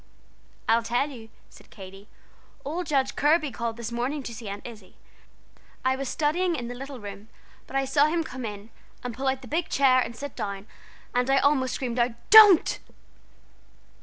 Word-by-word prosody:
"I'll 230 +1 +4
tell 245 +5 -1
you," 225 -4 -11 0.2
said - - -18
Katy. 195 0 -12 0.6
"Old 330 +4 -3
Judge 270 -3 0
Kirby 300 0 +2
called 235 -2 -4
this 235 0 -5
morning 260 +5 -2
to 235 - -7
see 225 -1 -9
Aunt 200 +1 -7
Izzie; 215 -6 -11 0.9
I 260 0 +3
was 270 -1 -4
studying 340 +4 0
in 240 -5 -5
the 245 - -5
little 270 +1 -8
room, 205 0 -9 0.4
but - - -10
I 270 0 +1
saw 285 +2 +3
him 330 +1 0
come 260 -4 -8
in, 210 0 -7 0.3
and 250 -1 -4
pull 265 +4 -4
out 265 0 -1
the - - -10
big 325 +2 -2
chair 265 -2 +4
and 235 -2 -3
sit 285 +3 -7
down, 200 -1 -5 0.5
and 250 +1 +1
I 270 - +4
almost 270 -2 +2
screamed 245 -2 -3
out 240 0 +2 0.2
'don't!'" 420 -5 +8
255 Hz, 185 wpm, -26 LUFS, 230-285 Hz, 0.9 s, don't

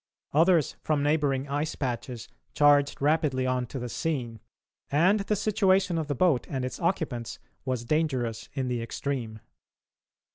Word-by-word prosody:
Others 165 0 +3
from 150 -2 0
neighbouring 145 -2 +1
ice 145 +3 -2
patches 120 -2 -4 0.3
charged 145 -1 +4
rapidly 145 -4 +2
on 130 -1 0
to 135 - -6
the 125 -1 -4
scene, 120 -5 -3 0.5
and 180 +9 +4
the 205 +1 0
situation 195 -4 +2
of 155 - -3
the 145 - -1
boat 155 -3 +2
and 130 -2 -2
its 130 - -5
occupants 160 -10 -2 0.3
was 130 -3 -2
dangerous 125 -7 -1
in 135 -2 -2
the 120 -2 -1
extreme. 115 -2 -4
140 Hz, 145 wpm, -27 LUFS, 125-160 Hz, 0.5 s, charged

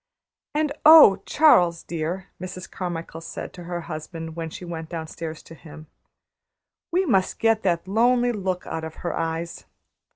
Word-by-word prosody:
"And 305 -1 +1
oh, 300 -12 +9
Charles, 175 - +4
dear," 170 +3 -4
Mrs. 185 0 -7
Carmichael 165 -2 -5
said 165 - -7
to 175 - -10
her 175 0 -4
husband, 160 0 -7
when 165 -1 -4
she 180 - -9
went 165 -2 -6
downstairs 160 -1 -6
to - - -13
him, 155 -1 -13 1.1
"We 370 +3 +2
must 195 - +1
get 225 -1 +2
that 175 -2 0
lonely 240 +4 +3
look 190 -4 -3
out 160 - -5
of 160 0 -7
her - - -1
eyes! 165 +1 -4
175 Hz, 155 wpm, -24 LUFS, 165-195 Hz, 1.1 s, oh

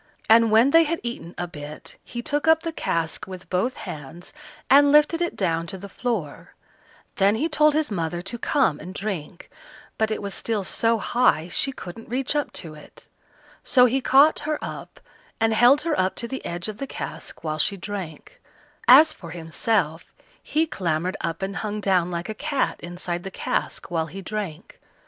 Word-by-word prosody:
And 225 0 +6
when 225 +5 +5
they 330 +1 +6
had 335 +2 -1
eaten 235 -8 -6
a 175 - -2
bit, 150 -2 -9
he 240 -1 -7
took 295 +2 -1
up 320 0 +5
the 330 - -2
cask 165 - -2
with 185 -1 -9
both 210 +8 0
hands, 150 +3 -8 0.3
and 285 +1 +6
lifted 300 +3 +4
it 345 - -1
down 165 -3 0
to 190 - -5
the 200 +2 -8
floor; 200 - -4 0.6
then 200 +2 +4
he 295 +9 0
told 300 -1 +3
his 310 -6 0
mother 175 -2 -2
to 205 +5 -5
come 265 - +1
and 185 +4 -9
drink, 190 -5 -5 0.5
but 220 0 +2
it 215 - -2
was 200 -1 -5
still 220 -3 -1
so 230 +4 +1
high 210 -7 +2
she 270 - 0
couldn't 225 -2 -10
reach 255 +4 -1
up 295 - 0
to 160 -4 -5
it; 150 - -15 0.6
so 250 -2 +5
he 260 +2 +1
caught 275 +5 +5
her 305 0 -2
up, - - -8 0.4
and 225 0 +2
held 245 +6 +6
her 330 -1 0
up 185 0 +1
to 235 - -3
the 265 +2 -6
edge 175 +2 -4
of 215 -1 -6
the 275 - -5
cask - - -7
while 155 -1 -3
she 200 +5 +2
drank; 195 - -7 0.5
as 305 +5 +8
for 170 - -11
himself, 165 +1 -1 0.4
he 315 +2 +1
clambered 180 - -2
up 165 +2 -3
and 195 0 -3
hung 210 -1 -3
down 185 -4 +2
like 175 0 -4
a 220 - -4
cat 280 +4 -1
inside 175 0 -4
the 195 - -6
cask 185 - -3
while 165 -2 0
he 180 +6 -8
drank. 190 -5 -6
205 Hz, 190 wpm, -24 LUFS, 175-265 Hz, 0.6 s, as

